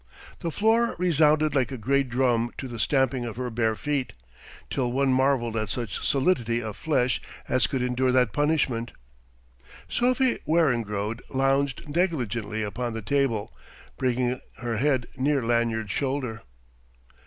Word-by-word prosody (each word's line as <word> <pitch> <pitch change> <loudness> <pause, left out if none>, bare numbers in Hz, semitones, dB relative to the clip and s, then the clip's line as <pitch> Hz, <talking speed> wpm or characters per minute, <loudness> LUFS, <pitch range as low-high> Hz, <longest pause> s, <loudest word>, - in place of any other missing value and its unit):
The 170 - -2
floor 225 +6 +2
resounded 155 -3 +3
like 135 -2 +1
a 130 - -4
great 135 +3 +1
drum 120 -2 +2
to 130 - -5
the 120 -2 -7
stamping 130 0 +1
of 115 -2 -5
her 125 0 -3
bare 110 -1 +1
feet, 140 0 -2 0.6
till 125 -3 0
one 135 +1 +2
marvelled 130 -3 +2
at 110 -1 -1
such 115 -6 -3
solidity 130 -6 +1
of 110 -3 -5
flesh 130 -3 0 0.3
as 130 - +2
could 130 -2 -1
endure 125 +1 +1
that 125 -4 +3
punishment. 145 -6 0 0.9
Sophie 255 +1 +1
Weringrode 115 -9 +1
lounged 135 +2 0
negligently 120 - -1
upon 115 +3 -3
the 110 -1 -5
table, 130 -4 0 0.4
bringing 125 0 0 0.2
her 115 -1 -3
head 130 0 +1
near 140 0 +1
Lanyard's 115 -2 0
shoulder. 130 -2 -2
130 Hz, 140 wpm, -26 LUFS, 115-140 Hz, 0.9 s, resounded